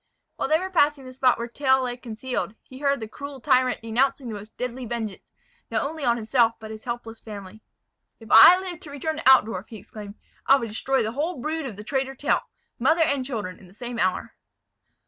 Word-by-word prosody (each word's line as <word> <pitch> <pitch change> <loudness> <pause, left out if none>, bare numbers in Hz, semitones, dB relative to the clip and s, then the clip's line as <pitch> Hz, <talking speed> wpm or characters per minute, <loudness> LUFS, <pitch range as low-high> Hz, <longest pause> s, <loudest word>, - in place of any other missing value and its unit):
While - - -2
they 310 - +5
were 375 +3 -5
passing 295 -5 +2
the 255 - -9
spot 255 -1 +3
where 235 - -4
Tell 265 +1 +2
lay 245 -1 -2
concealed, 245 -2 -4
he 260 - -13
heard 280 -1 +1
the 220 - -6
cruel 280 +5 -8
tyrant 255 -2 +2
denouncing 260 +4 0
the - - -5
most 210 +1 -10
deadly 250 +1 -4
vengeance, 220 -4 -4 0.5
not - - 0
only 310 +1 -5
on 240 -2 +3
himself, 230 0 +2
but 220 -1 -9
his 220 +2 -10
helpless 235 -2 -5
family: 205 -1 -10 0.6
"If 225 -2 -13
I 280 +11 +10
live 365 -3 -6
to 300 - -11
return 305 +3 -3
to 310 - +3
Altdorf," 215 -6 +3
he 225 - -8
exclaimed, 205 +1 -10 0.3
"I 270 - +8
will 245 -4 -2
destroy 255 +4 0
the 220 - -2
whole 305 +7 -2
brood 310 +2 -3
of 225 - -7
the 210 - -9
traitor 270 +3 -2
Tell, 290 - +1 0.4
mother 320 +7 +4
and 280 -4 +1
children, 215 -8 -5
in 190 - -16
the 185 - -19
same 240 0 -6
hour." 185 -2 0
250 Hz, 215 wpm, -25 LUFS, 220-280 Hz, 0.6 s, I